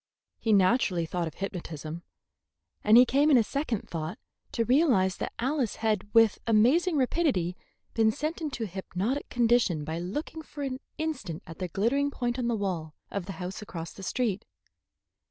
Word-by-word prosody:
He 225 - 0
naturally 190 -3 +3
thought 170 +1 -2
of 160 - -8
hypnotism, 165 -4 -5 0.8
and 215 +2 +7
he 250 - +9
came 280 +5 +3
in 280 - +7
a 230 - +5
second 245 -2 -2
thought 160 0 -4 0.3
to 230 - 0
realize 245 - +3
that - - -4
Alice 260 -2 0
had 210 -2 -1
with 225 -3 +5
amazing 275 +11 +4
rapidity 255 - +1 0.4
been 220 -1 +4
sent 305 +6 -3
into 285 -7 -3
a - - 0
hypnotic 195 +7 -3
condition 235 -9 +2
by 160 +2 -3
looking 290 - -4
for 295 -2 -8
an 260 -1 -3 0.2
instant 305 - -4
at 165 - -10
the 185 - -2
glittering 240 - +1
point 245 -2 -2
on 240 - 0
the 235 - +1
wall 175 -7 -3 0.2
of 195 -3 -4
the 195 - -4
house 185 +3 -6
across 165 -5 -7
the - - -11
street. 210 0 -1
220 Hz, 175 wpm, -28 LUFS, 180-260 Hz, 0.8 s, he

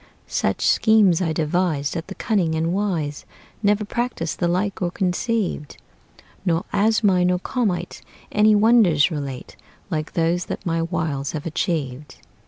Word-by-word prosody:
Such - - -1
schemes 210 -6 +4
I 165 -3 0
devise 155 -2 0
That 165 -1 -5
the 195 - -8
cunning 180 -8 0
and 165 +2 0
wise 170 -8 -2 0.4
Never 210 0 +2
practiced 235 -7 -3
the 175 - +1
like 190 +3 -1
or 175 - +1
conceived; 185 - -2 0.7
Nor 170 -3 0
Asmai 205 -3 +3
nor 180 0 +2
Komait 185 -4 -2 0.3
Any 210 +1 +4
wonders 205 -8 +4
relate 140 -4 -6 0.4
Like 155 -2 -3
those 170 +1 +1
that - - -6
my 165 -1 0
wiles 150 -4 -2
have 150 -2 -5
achieved. 150 -4 -3
175 Hz, 140 wpm, -22 LUFS, 160-205 Hz, 0.7 s, schemes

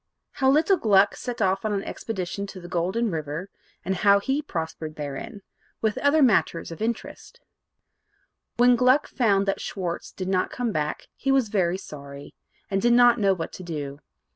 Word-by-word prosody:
HOW 265 -1 +1
LITTLE 320 +7 +4
GLUCK 200 - +4
SET 240 -3 -3
OFF 190 0 +1
ON 215 -1 -1
AN 200 -1 -1
EXPEDITION 200 -2 -4
TO 195 - -9
THE 175 - -10
GOLDEN 190 +6 -1
RIVER, 160 +4 -4 0.3
AND 190 0 -1
HOW 200 0 +5
HE 270 +8 -1
PROSPERED 160 - -5
THEREIN; 150 +8 -6 0.4
WITH 220 -1 0
OTHER 285 +1 +4
MATTERS 195 -8 +2
OF 165 - -9
INTEREST 230 0 -4 1.2
When 245 +1 +6
Gluck 255 +4 +3
found 200 -6 +2
that 195 - -1
Schwartz 175 -3 -4
did 185 - -6
not 185 -1 +1
come 245 -2 -2
back 150 -4 -2
he 270 - -1
was 265 -5 +2
very 185 -3 +1
sorry, 140 -5 -10 0.4
and 195 0 +1
did 240 0 +4
not 245 0 +6
know 195 -2 +3
what 165 -2 -5
to - - -8
do. 145 -5 -5
195 Hz, 175 wpm, -25 LUFS, 175-235 Hz, 1.2 s, When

